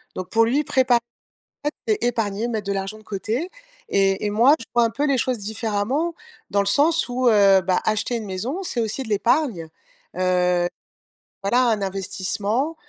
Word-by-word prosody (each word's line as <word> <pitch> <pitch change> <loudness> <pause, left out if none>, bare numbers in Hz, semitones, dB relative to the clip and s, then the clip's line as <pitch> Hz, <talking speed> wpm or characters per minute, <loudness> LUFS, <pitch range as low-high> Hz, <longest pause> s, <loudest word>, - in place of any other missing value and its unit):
Donc 185 - -5
pour 225 0 +4
lui, 270 +6 +1
prépa 260 -3 +3 0.7
aite, 295 - 0 0.2
c'est 430 -1 +1
épargner, 225 -1 -1
mettre 220 -3 -3
de 200 - 0
l'argent 195 +2 -4
de - - -17
côté 220 - -3 0.4
et 195 +1 +1
et - - 0
moi, 235 +7 +5
je - - -8
vois 240 - +5
un 230 - +1
peu 280 +6 -1
les 275 -3 +2
choses 250 0 0
différemment 220 +9 -2 0.4
dans 200 - +2
le 200 - 0
sens 300 +11 +2
où, 250 0 +1
heu, 200 -3 +6
bah, 180 +1 +1
acheter 215 +3 0
une 220 -2 -5
maison, 235 - -4
c'est 255 -9 -3
aussi 225 +4 -2
de 250 - -8
l'épargne, 220 - +1 0.5
heu, 180 -1 +2 0.8
voilà, 240 +6 +3
un 215 -3 0
investissement. 195 - -2
220 Hz, 180 wpm, -22 LUFS, 195-255 Hz, 0.8 s, heu